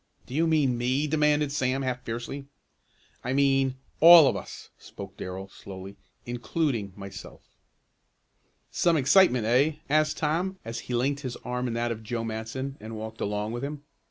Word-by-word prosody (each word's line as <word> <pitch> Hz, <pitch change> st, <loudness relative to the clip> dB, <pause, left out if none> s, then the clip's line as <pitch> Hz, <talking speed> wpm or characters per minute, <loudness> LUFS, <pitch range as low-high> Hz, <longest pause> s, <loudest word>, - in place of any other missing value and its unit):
"Do -, -, -10 dB
you 165 Hz, +4 st, +2 dB
mean 140 Hz, -7 st, +2 dB
me?" 130 Hz, +4 st, +1 dB
demanded 150 Hz, -1 st, +2 dB
Sam 135 Hz, -1 st, 0 dB
half 125 Hz, -1 st, -2 dB
fiercely. 120 Hz, +4 st, -5 dB, 0.8 s
"I 125 Hz, -, -1 dB
mean 135 Hz, -1 st, +2 dB, 0.2 s
all 165 Hz, -2 st, +10 dB
of 130 Hz, -, +1 dB
us," -, -, -8 dB
spoke -, -, -10 dB
Darrell 95 Hz, +1 st, -6 dB
slowly, 95 Hz, 0 st, -10 dB, 0.3 s
"including 120 Hz, -, -2 dB
myself." 100 Hz, 0 st, -10 dB, 1.3 s
"Some 170 Hz, -2 st, +2 dB
excitement; 140 Hz, -, +4 dB
eh?" 130 Hz, +7 st, +3 dB, 0.2 s
asked 155 Hz, 0 st, +2 dB
Tom, 175 Hz, +5 st, -1 dB
as 115 Hz, 0 st, -4 dB
he 125 Hz, -, 0 dB
linked 140 Hz, +4 st, 0 dB
his 130 Hz, -4 st, -5 dB
arm 125 Hz, 0 st, -2 dB
in 115 Hz, -, -3 dB
that 120 Hz, 0 st, -1 dB
of 110 Hz, -1 st, -5 dB
Joe 115 Hz, +1 st, -3 dB
Matson 115 Hz, +5 st, -4 dB
and 110 Hz, +1 st, -8 dB
walked 110 Hz, +1 st, -7 dB
along 105 Hz, +1 st, -2 dB
with 120 Hz, +2 st, -4 dB
him. 145 Hz, 0 st, -5 dB
130 Hz, 160 wpm, -27 LUFS, 115-145 Hz, 1.3 s, all